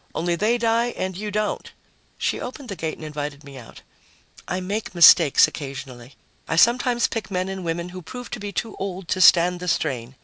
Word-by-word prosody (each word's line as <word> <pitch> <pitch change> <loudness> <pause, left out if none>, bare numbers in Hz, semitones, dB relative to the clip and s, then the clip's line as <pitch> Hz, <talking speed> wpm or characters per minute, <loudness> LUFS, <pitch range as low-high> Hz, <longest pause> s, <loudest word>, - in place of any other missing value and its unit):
Only 170 +1 0
they 220 +7 +1
die 230 0 +1
and 185 -1 -3
you 210 +3 -5
don't." 210 +1 -3 0.5
She - - -1
opened 255 +1 -8
the 200 - -4
gate 160 -2 -4
and 155 - -9
invited 150 -1 -6
me 140 -1 -12
out. 115 - -14 0.6
"I 180 - -2
make 200 +1 -4
mistakes 170 -3 +7
occasionally. 135 -3 -8 0.3
I 165 - -1
sometimes 240 +5 +3
pick 220 -3 -5
men 185 -1 -2
and 190 -1 -5
women 170 +1 -3
who 185 +1 -9
prove 245 +8 -9
to 245 - -5
be 205 0 -5
too 225 +2 -4
old 190 -2 -5
to 185 - 0
stand 180 0 +6
the 180 - -6
strain. 135 -7 -2
180 Hz, 200 wpm, -23 LUFS, 155-210 Hz, 0.6 s, mistakes